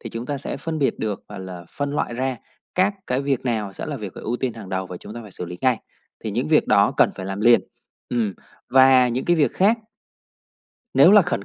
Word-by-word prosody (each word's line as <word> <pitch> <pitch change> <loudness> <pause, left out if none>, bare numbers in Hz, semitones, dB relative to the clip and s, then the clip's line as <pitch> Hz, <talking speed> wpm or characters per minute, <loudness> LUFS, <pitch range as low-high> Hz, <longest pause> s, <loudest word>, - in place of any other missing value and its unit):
thì 115 - -7
chúng 115 +2 -6
ta 145 -1 -3
sẽ - - -4
phân 160 -1 -4
biệt 140 - 0
được, 105 -2 -3
gọi - - -8
là, 90 -2 -8
phân 145 0 -3
loại 120 - -1
ra 130 0 -1 0.4
các 195 +2 +2
cái 125 +2 0
việc 140 -3 0
nào 105 -4 -1
sẽ - - -6
là 150 -2 -4
việc 105 -6 -7
phải - - -9
ưu 120 +3 -1
tiên 125 -2 -2
hàng 105 -4 -9
đầu, 95 0 -2
và 90 - -7
chúng 105 - -10
ta 120 - -7
phải 105 - -12
xử 90 - -4
lý 90 +1 -8
ngay, 130 -3 +3 0.5
thì - - -2
những - - -2
việc - - +4
đó - - +4
cần - - +5
phải 95 - -6
làm 95 +1 -4
liền. 120 +1 +6 0.5
Ừm, 110 -6 0 0.4
và 130 -1 +6
những 125 +2 -2
cái 175 -1 +4
việc 150 - +2
khác 215 +5 +3 1.2
Nếu 155 +9 +7
là 210 -2 +8
khẩn 100 - -2
120 Hz, 250 wpm, -22 LUFS, 105-140 Hz, 1.2 s, là